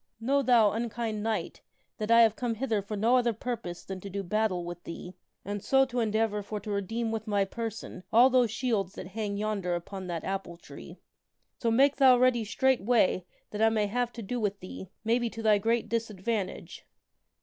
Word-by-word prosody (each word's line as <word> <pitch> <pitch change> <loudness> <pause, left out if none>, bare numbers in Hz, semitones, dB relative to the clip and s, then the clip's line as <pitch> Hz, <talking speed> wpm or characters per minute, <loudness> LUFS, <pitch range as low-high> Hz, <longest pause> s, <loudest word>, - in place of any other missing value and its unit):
Know, 275 +5 +2
thou 235 -6 +5
unkind 225 -1 -3
knight, 220 0 -3 0.4
that 215 0 -3
I 230 0 +7
have 220 -1 +3
come 240 -2 -2
hither 225 -3 -1
for 205 +2 -5
no 230 +5 +4
other 240 -2 +2
purpose 220 -6 -5
than 190 -1 -6
to 200 - -7
do 200 +1 -4
battle 190 -2 0
with 175 0 -7
thee 175 +2 -8 0.3
and 205 0 -4
so 270 0 +4
to 250 -1 -3
endeavor 220 -1 0
for 210 +1 -5
to 210 - -6
redeem 220 +3 -2
with 220 0 -4
my 200 -2 +2
person 225 -2 -6
all 245 +4 +6
those 250 -2 +4
shields 215 -5 -1
that 185 - -7
hang 205 0 -3
yonder 200 -4 -1
upon 185 +2 -6
that 170 -2 -4
apple 195 -3 -4
tree. - - -12 0.6
So 235 - +1
make 275 +5 +4
thou 260 -3 +7
ready 245 -2 +3
straightway 225 -5 +2 0.3
that 210 - -4
I 225 - +6
may 215 -2 +1
have 240 +3 -1
to 230 - -7
do 245 +5 -3
with 205 -2 -1
thee, 185 0 -9
maybe 235 +1 +1
to 225 0 -8
thy 210 -2 +4
great 230 +3 0
disadvantage." 220 -2 -3
220 Hz, 195 wpm, -29 LUFS, 200-235 Hz, 0.6 s, I